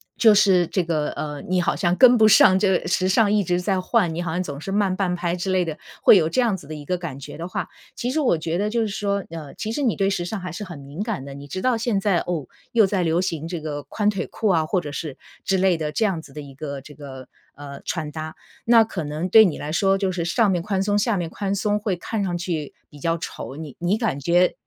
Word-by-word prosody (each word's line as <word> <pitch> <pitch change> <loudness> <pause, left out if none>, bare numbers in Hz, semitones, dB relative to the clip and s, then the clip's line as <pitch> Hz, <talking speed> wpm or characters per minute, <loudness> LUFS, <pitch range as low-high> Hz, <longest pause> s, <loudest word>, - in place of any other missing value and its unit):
就 220 -3 +6
是 190 -4 +4
这 185 - 0
个， 160 -3 -1
呃， 150 -1 -5
你 185 -1 +2
好 175 - +1
像 175 -2 +1
跟 245 +2 +7
不 220 - +7
上 195 -2 +6
这 200 - +2
个 - - -7
时 185 +1 +1
尚 205 +1 +3
一 210 -1 +3
直 180 0 0
在 185 0 0
换， 185 -4 +1
你 170 - -3
好 175 - -3
像 175 +3 -1
总 145 -4 -7
是 195 - -5
慢 195 -2 +1
半 185 -2 0
拍 175 0 -1
之 185 +2 -3
类 185 -1 +2
的， 160 -2 -4 0.3
会 - - +8
有 160 -4 +3
这 255 - 0
样 235 -5 +2
子 160 -7 -11
的 155 - -6
一 145 -1 -9
个 180 +2 -1
感 155 -6 -6
觉 140 - -9
的 170 +3 -6
话。 - - -4 0.3
其 245 +1 -2
实 315 - 0
我 250 - +2
觉 165 +3 -2
得 210 - 0
就 230 +2 0
是 220 - 0
说， 200 -1 -2
呃， 160 -4 -8
其 220 - -4
实 290 - -2
你 245 -6 +1
对 195 0 +1
时 175 - -1
尚 200 +4 -4
还 180 -1 -6
是 180 +5 -6
很 175 -5 -8
敏 140 +6 -8
感 210 - -3
的， 140 - -8
你 140 +1 -10
知 185 +5 -5
道 255 -1 +3
现 225 -3 0
在， 195 -3 +2
哦， 165 -6 -3 0.3
又 225 -3 +6
在 195 -1 0
流 165 0 +1
行 165 -4 -3
这 170 -1 -4
个， 150 -2 -5
宽 205 +9 -2
腿 195 - -4
裤 215 - -1
啊， 160 -4 +2
或 185 - +1
者 145 - -7
是 145 -1 -5 0.3
之 195 - +1
类 185 -2 +3
的 155 -2 -3
这 220 - +1
样 185 -6 -1
子 145 - -15
的 150 - -7
一 140 -1 -11
个 140 0 -6
这 145 +2 -13
个， 135 -3 -10 0.3
呃， 140 -1 -9
穿 155 -3 -3
搭。 155 0 -6 0.3
那 230 -1 +6
可 210 -6 -5
能 155 +4 -3
对 220 +4 +9
你 180 -8 0
来 150 +1 -5
说 195 +3 +2
就 190 -1 0
是 175 -2 -2
上 205 +4 +2
面 175 -2 0
宽 195 0 -1
松， 205 +1 +1
下 220 -1 +1
面 175 -2 -2
宽 200 -1 -2
松， 210 +1 0
会 205 -3 -1
看 205 +3 -3
上 175 -2 -1
去 165 -5 -4
比 145 - -15
较 165 +3 0
丑。 140 - -7
你 150 -2 -8
你 180 +5 +1
感 220 - -1
觉 175 +5 +3
180 Hz, 300 characters per minute, -23 LUFS, 155-205 Hz, 0.3 s, 对